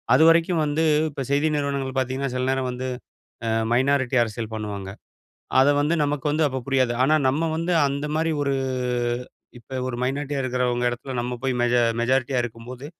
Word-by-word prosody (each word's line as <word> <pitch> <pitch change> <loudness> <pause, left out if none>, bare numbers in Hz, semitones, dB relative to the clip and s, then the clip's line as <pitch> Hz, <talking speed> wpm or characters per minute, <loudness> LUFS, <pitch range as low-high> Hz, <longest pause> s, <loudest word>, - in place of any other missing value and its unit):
அதுவரைக்கும் 165 +3 +4
வந்து 150 +2 0 0.3
இப்ப 140 -2 -6
செய்தி 145 +2 +2
நிறுவனங்கள் 140 -2 -2
பாத்தீங்கன்னா 130 +1 -2
சில 125 0 0
நேரம் 135 0 0
வந்து 125 +1 -4 0.6
அ - - 0 0.2
மைனாரிட்டி 130 +1 +2
அரசியல் 110 0 -4
பண்ணுவாங்க. 105 -3 -5 0.7
அத 135 +2 +5
வந்து 150 +4 +1
நமக்கு 145 -1 -2
வந்து 155 +2 +1
அப்ப 130 -1 -3
புரியாது. 130 -3 +2
ஆனா, 150 +4 +4
நம்ம 160 +5 0
வந்து 170 +2 0
அந்தமாரி 150 +3 -1
ஒரு 140 -1 0 1.1
இப்ப 130 +3 -7
ஒரு 130 - -3
மைனாரிட்டியா 140 +2 -2
இருக்கிறவுங்க 125 -1 0
இடத்தில 120 +2 -6
நம்ம 120 +1 -2
போய் 135 -1 +1
மெஜ 120 0 +2 0.3
மெஜாரிட்டியா 130 +1 +1
இருக்கும்போது, 120 +3 -8
135 Hz, 155 wpm, -24 LUFS, 125-145 Hz, 1.1 s, அத